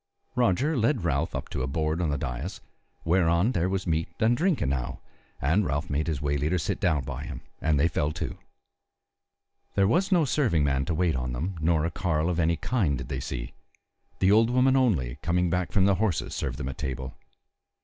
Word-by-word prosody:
Roger 125 - +2
led 115 - +1
Ralph 80 -1 0
up 65 - -4
to - - -3
a 65 - -1
board 80 +3 -1
on 85 - 0
the 70 - 0
dais, 65 +8 -4 0.5
whereon 85 +4 +3
there 90 -4 0
was 95 -1 -2
meat 80 -1 0
and 115 +1 +3
drink 170 +3 +1
enow, 65 -3 -2 0.4
and 80 +10 +2
Ralph 70 -2 -2
made 75 +2 0
his 80 -4 -1
way 70 0 0
leader 75 +6 0
sit 80 - -2
down 80 -6 +1
by 70 +1 -5
him, 70 -8 -7 0.2
and 75 -2 +2
they 80 - +4
fell 75 -3 0
to. - - -5 1.4
There 100 -1 +4
was 180 - +2
no 175 -4 +4
serving 120 - +2
man 70 -1 +1
to 85 - -1
wait 85 -2 +1
on 65 -1 -2
them 85 +10 -3
nor 80 -1 +2
a 85 - -1
carle 80 -1 0
of 85 - -2
any 85 0 +3
kind 95 - 0
did 65 +2 -7
they 65 -2 -2
see; - - -5 0.6
the 95 +1 +3
old 110 +2 +5
woman 130 +2 +3
only, 75 - +1
coming 90 0 +1
back 90 0 -1
from 95 -2 +3
the 100 - +4
horses, 95 -5 -1
served - - -3
them 65 - -4
at 65 - -8
table. 65 0 -4
80 Hz, 210 wpm, -27 LUFS, 70-95 Hz, 1.4 s, old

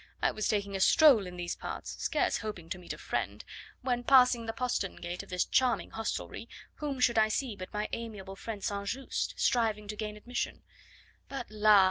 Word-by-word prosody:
"I - - +2
was 215 - -1
taking 200 -2 0
a - - -1
stroll 255 - +6
in 180 0 -8
these 175 -1 -3
parts, - - -6
scarce - - +1
hoping 200 -7 -6
to 185 - -3
meet 180 - -7
a - - -5
friend, - - -3 0.4
when, 245 -2 0
passing 250 -3 +5
the - - 0
postern 240 -5 -1
gate 175 +1 -5
of - - -14
this 180 -1 +1
charming 255 -3 +2
hostelry, 225 0 -4 0.3
whom 285 -3 -3
should 235 -2 +4
I 215 - +5
see 225 +1 -1
but 185 -1 -8
my 210 0 -2
amiable 205 -4 -5
friend 210 0 -6
St. 200 0 -2
Just 265 +5 -3
striving 220 -3 +2
to 210 - -3
gain 210 0 -4
admission. 240 +3 -4 0.7
But, 265 -5 -5
la! 215 -1 +6
215 Hz, 195 wpm, -31 LUFS, 200-245 Hz, 0.7 s, stroll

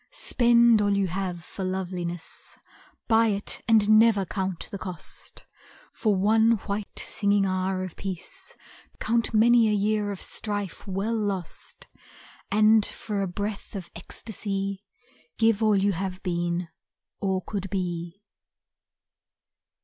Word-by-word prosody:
Spend 235 - +4
all 205 -1 +2
you 200 - +2
have 180 -1 -3
for 190 - -7
loveliness, 180 -2 -4 0.5
Buy 225 0 +5
it 205 -1 -1
and 215 -1 +6
never 220 -4 +4
count 190 -2 -3
the 200 - -5
cost; 180 -5 -7 0.5
For 215 -4 +1
one 220 +4 +4
white 200 0 -4
singing 200 -1 +1
hour 185 0 -1
of 185 -3 -7
peace 200 - -7 0.4
Count 230 +1 +1
many 230 0 +5
a - - +2
year 210 0 +1
of 195 - -6
strife 205 -3 -4
well 195 +4 -1
lost, 200 -6 -4 0.6
And 215 +1 +5
for 205 0 -3
a 195 - 0
breath 205 +4 -5
of 180 -3 -7
ecstasy 195 +1 -4 0.5
Give 225 -1 +3
all 215 -1 +4
you 200 +1 +3
have 185 +1 -4
been, 175 -1 -1 0.5
or 190 -2 -1
could 195 -2 -4
be. 175 0 -4
200 Hz, 125 wpm, -26 LUFS, 185-215 Hz, 0.6 s, and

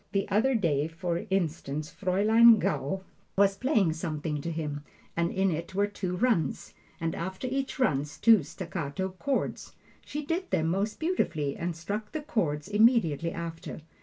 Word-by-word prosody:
The 195 -1 +1
other 230 +7 +3
day, 155 -8 +1
for 170 +1 -3
instance, 155 -5 -2
Fraulein 215 +5 +5
Gaul 190 -1 -1 0.3
was 195 0 +4
playing 215 - +2
something 155 -2 -3
to 165 - -3
him, 150 -3 -4 0.3
and 170 0 +1
in 190 0 +1
it 170 +3 -4
were 200 +1 +3
two 195 -3 -4
runs, 225 -6 0 0.3
and 165 -1 -1
after 190 +7 -4
each 265 +1 -2
run 145 - +2 0.2
two 225 -4 +6
staccato 170 +2 -4
chords. 280 -2 -2 0.3
She 300 0 -5
did 350 +4 -2
them 160 0 +1
most 200 +5 -1
beautifully 160 - 0
and 170 0 -3
struck 205 - -5
the 310 - -2
chords 155 - -1
immediately 205 - +3
after. 165 -1 -6
185 Hz, 155 wpm, -29 LUFS, 160-215 Hz, 0.3 s, two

